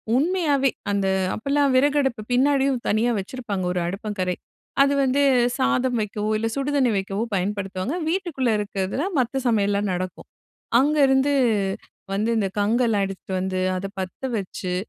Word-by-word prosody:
உண்மையாவே 290 Hz, -2 st, +2 dB, 0.2 s
அந்த 200 Hz, -1 st, +1 dB, 0.3 s
அப்ப 220 Hz, -, -10 dB
எல்லாம் 285 Hz, -1 st, +3 dB
விறகு 285 Hz, +3 st, +3 dB
அடுப்பு 265 Hz, -5 st, -1 dB
பின்னாடியும் 270 Hz, 0 st, +3 dB
தனியா 225 Hz, +3 st, +2 dB
வச்சிருப்பாங்க 200 Hz, -2 st, -4 dB
ஒரு 180 Hz, -, -1 dB
அடுப்பங்கரை. 195 Hz, -1 st, -3 dB, 0.5 s
அது 280 Hz, 0 st, +4 dB
வந்து 270 Hz, +2 st, +2 dB, 0.4 s
சாதம் 255 Hz, -1 st, +1 dB
வைக்கவோ! 210 Hz, 0 st, -3 dB
இல்ல 225 Hz, +1 st, -1 dB
சுடுதண்ணி 275 Hz, -2 st, +1 dB
வைக்கவோ! 195 Hz, +2 st, -2 dB
பயன்படுத்துவாங்க. 195 Hz, -, -2 dB
வீட்டுக்குள்ளே 325 Hz, -9 st, 0 dB
இருக்கிறதுல 200 Hz, +4 st, -2 dB, 0.2 s
மத்த 255 Hz, +2 st, 0 dB
சமையல்லாம் 205 Hz, -2 st, +1 dB
நடக்கும். 185 Hz, +1 st, -5 dB, 0.5 s
அங்கேருந்து 280 Hz, -1 st, +3 dB, 0.8 s
வந்து 210 Hz, +3 st, 0 dB
இந்த 205 Hz, -3 st, +1 dB
கங்கெல்லாம் 220 Hz, -1 st, +2 dB
எடுத்துட்டு 190 Hz, 0 st, -7 dB
வந்து 185 Hz, 0 st, -2 dB, 0.2 s
அத 185 Hz, -, -5 dB
பத்த 185 Hz, -1 st, -6 dB, 0.2 s
வச்சு, 185 Hz, -2 st, -4 dB
225 Hz, 135 wpm, -23 LUFS, 195-270 Hz, 0.8 s, அது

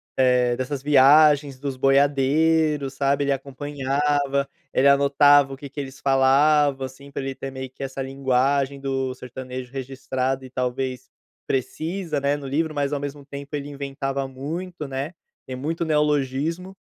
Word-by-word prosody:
eh, 125 Hz, -2 st, +3 dB
dessas 130 Hz, +2 st, -4 dB
viagens 145 Hz, 0 st, +5 dB
dos 140 Hz, -2 st, -4 dB
boiadeiros, 140 Hz, +2 st, +2 dB
sabe, 140 Hz, +1 st, +1 dB
ele 140 Hz, -, 0 dB
acompanhava, 140 Hz, +1 st, -1 dB, 0.2 s
ele 135 Hz, -, +3 dB
anotava 140 Hz, 0 st, +5 dB
o -, -, -8 dB
que 140 Hz, 0 st, -9 dB
que 140 Hz, -, -8 dB
eles 135 Hz, -2 st, -7 dB
falavam, 135 Hz, +1 st, +3 dB
assim, 140 Hz, +2 st, -11 dB
pra 140 Hz, -, -4 dB
ele 135 Hz, 0 st, -3 dB
ter 135 Hz, +1 st, -6 dB
meio 130 Hz, 0 st, -6 dB
que 130 Hz, -, -14 dB
essa 135 Hz, 0 st, -4 dB
linguagem 135 Hz, +1 st, 0 dB
do 135 Hz, -1 st, -2 dB
sertanejo 125 Hz, 0 st, -8 dB
registrado 130 Hz, 0 st, -3 dB
e -, -, -10 dB
talvez 130 Hz, 0 st, -3 dB, 0.4 s
precisa, 155 Hz, +5 st, -2 dB
né, 140 Hz, +1 st, +1 dB
no 145 Hz, -, -9 dB
livro, 155 Hz, +3 st, -1 dB
mas 145 Hz, 0 st, -1 dB
ao 145 Hz, -, -1 dB
mesmo 145 Hz, 0 st, -6 dB
tempo 140 Hz, +1 st, -7 dB
ele 145 Hz, 0 st, -5 dB
inventava 135 Hz, -1 st, -4 dB
muito, 155 Hz, +5 st, -6 dB
né, 135 Hz, +5 st, -4 dB, 0.3 s
tem 130 Hz, -, -5 dB
muito 160 Hz, +6 st, -3 dB
neologismo, 150 Hz, +4 st, 0 dB
140 Hz, 155 wpm, -23 LUFS, 130-145 Hz, 0.4 s, viagens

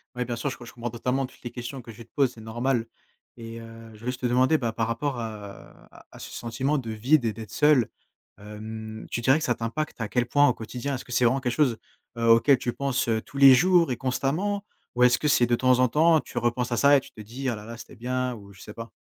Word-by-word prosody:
Ouais, 125 Hz, 0 st, -2 dB
bien 120 Hz, 0 st, -3 dB
sûr 120 Hz, +4 st, -2 dB
je 115 Hz, -, -7 dB
que 120 Hz, -, -11 dB
je -, -, -12 dB
comprends 120 Hz, -1 st, -5 dB
totalement 125 Hz, +3 st, -1 dB
toutes 130 Hz, -, -16 dB
les 120 Hz, -, -6 dB
questions 125 Hz, +2 st, -7 dB
que 115 Hz, -, -15 dB
tu 115 Hz, +1 st, -12 dB
te -, -, -36 dB
pose, 135 Hz, -4 st, +2 dB
c'est 110 Hz, -, -13 dB
normal 120 Hz, +2 st, -1 dB, 0.5 s
et 115 Hz, 0 st, -8 dB
heu, 115 Hz, 0 st, -12 dB
je 105 Hz, -, -15 dB
veux 120 Hz, -, -8 dB
juste 125 Hz, 0 st, -3 dB
te -, -, -2 dB
demander, 130 Hz, +5 st, +3 dB
bah, 115 Hz, -5 st, -2 dB
par 115 Hz, 0 st, -1 dB
rapport 125 Hz, +3 st, -2 dB
à 105 Hz, -3 st, -9 dB, 0.2 s
à -, -, -13 dB
ce -, -, -8 dB
sentiment 130 Hz, +6 st, -2 dB
de 115 Hz, -5 st, -4 dB
vide 125 Hz, +7 st, +2 dB
et 115 Hz, -, 0 dB
d'être 110 Hz, -1 st, -9 dB
seul. 145 Hz, -5 st, +4 dB, 0.5 s
Hem, 110 Hz, +1 st, -8 dB
tu 120 Hz, -, -3 dB
dirais 130 Hz, +5 st, +4 dB
que -, -, -2 dB
ça 120 Hz, -, +1 dB
t'impacte 115 Hz, +4 st, -4 dB
à 110 Hz, -, -3 dB
quel 125 Hz, -1 st, +1 dB
point 145 Hz, +3 st, +4 dB
au -, -, +2 dB
quotidien, 125 Hz, +5 st, -5 dB
est-ce 130 Hz, -, -7 dB
que 125 Hz, -, -8 dB
c'est 125 Hz, -, +2 dB
vraiment 125 Hz, +3 st, +3 dB
quelque 125 Hz, -2 st, -2 dB
chose, 130 Hz, -6 st, +2 dB, 0.4 s
heu, 115 Hz, -, 0 dB
auquel 115 Hz, +4 st, +6 dB
tu 120 Hz, 0 st, -3 dB
penses, 140 Hz, -3 st, -1 dB
heu, 110 Hz, -1 st, +1 dB
tous 140 Hz, -, -12 dB
les 135 Hz, -1 st, +9 dB
jours 175 Hz, +5 st, +4 dB
et -, -, 0 dB
constamment? 150 Hz, +11 st, -1 dB, 0.3 s
Ou 125 Hz, -, +3 dB
est-ce 125 Hz, 0 st, +5 dB
que 150 Hz, -, 0 dB
c'est 125 Hz, -, +4 dB
de 120 Hz, 0 st, +2 dB
temps 130 Hz, 0 st, +3 dB
en 130 Hz, -, +5 dB
temps 160 Hz, +5 st, +4 dB
tu -, -, -10 dB
repenses 120 Hz, +1 st, 0 dB
à -, -, 0 dB
ça 140 Hz, +4 st, +6 dB
et -, -, +2 dB
tu -, -, -14 dB
te 110 Hz, -, -11 dB
dis: 125 Hz, +6 st, -6 dB
«Ah 115 Hz, -, -1 dB
la 105 Hz, -, -9 dB
la, 115 Hz, +2 st, -9 dB
c'était 115 Hz, -, -12 dB
bien» 125 Hz, +2 st, -2 dB
ou 100 Hz, -2 st, -13 dB
je 95 Hz, -, -17 dB
sais 105 Hz, -, -10 dB
pas? 115 Hz, 0 st, -8 dB
120 Hz, 275 wpm, -26 LUFS, 115-135 Hz, 0.5 s, les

